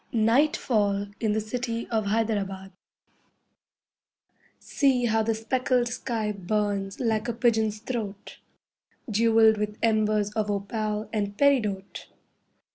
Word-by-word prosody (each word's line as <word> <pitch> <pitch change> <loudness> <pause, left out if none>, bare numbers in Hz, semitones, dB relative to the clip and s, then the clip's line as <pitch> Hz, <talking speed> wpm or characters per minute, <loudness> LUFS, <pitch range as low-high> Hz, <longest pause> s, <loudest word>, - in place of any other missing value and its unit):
NIGHTFALL 220 -4 +2
IN 220 -2 0
THE 220 - +1
CITY 230 +1 -4
OF 220 -3 0
HYDERABAD 200 -3 -1 1.9
See 265 -4 +1
how 225 -1 +2
the 225 0 0
speckled 245 +2 0
sky 230 -3 -2
burns 200 0 -2
like 220 -2 0
a 235 - -1
pigeon's 220 -2 +1
throat, 215 -3 -6 0.7
Jewelled 220 0 +4
with 210 0 -3
embers 215 -2 +2
of 210 -1 -2
opal 210 +1 -2
and 205 -1 -2
peridote. 215 -9 +1
220 Hz, 110 wpm, -26 LUFS, 205-230 Hz, 1.9 s, Jewelled